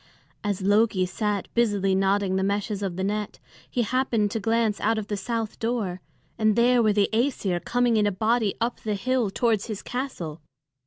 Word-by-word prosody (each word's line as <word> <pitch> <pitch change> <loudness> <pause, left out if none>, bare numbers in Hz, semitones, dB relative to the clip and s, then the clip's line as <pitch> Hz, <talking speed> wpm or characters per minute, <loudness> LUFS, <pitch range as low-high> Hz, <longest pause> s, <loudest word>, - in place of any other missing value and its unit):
As 205 -2 -2
Loki 205 -1 +3
sat 205 +1 -2
busily 205 -5 +2
knotting 195 0 +2
the 190 - +1
meshes 200 +1 -1
of 190 -3 -2
the 190 - -3
net, 210 +1 -2 0.3
he 245 - 0
happened 230 -3 +1
to 225 - -1
glance 225 -1 +1
out 225 +1 +2
of 215 -2 -4
the 210 - -1
south 225 +2 -3
door, 220 -6 -2 0.4
and 215 -1 +3
there 240 +1 +4
were 215 -2 +4
the 205 -1 +3
Æsir 220 -7 0
coming 245 -2 +2
in 210 -1 +3
a - - +1
body 220 +1 +1
up 235 +1 -1
the 215 -1 -2
hill 250 +1 0
towards 220 0 0
his 215 -3 -5
castle. 180 - -5
210 Hz, 190 wpm, -25 LUFS, 195-230 Hz, 0.4 s, there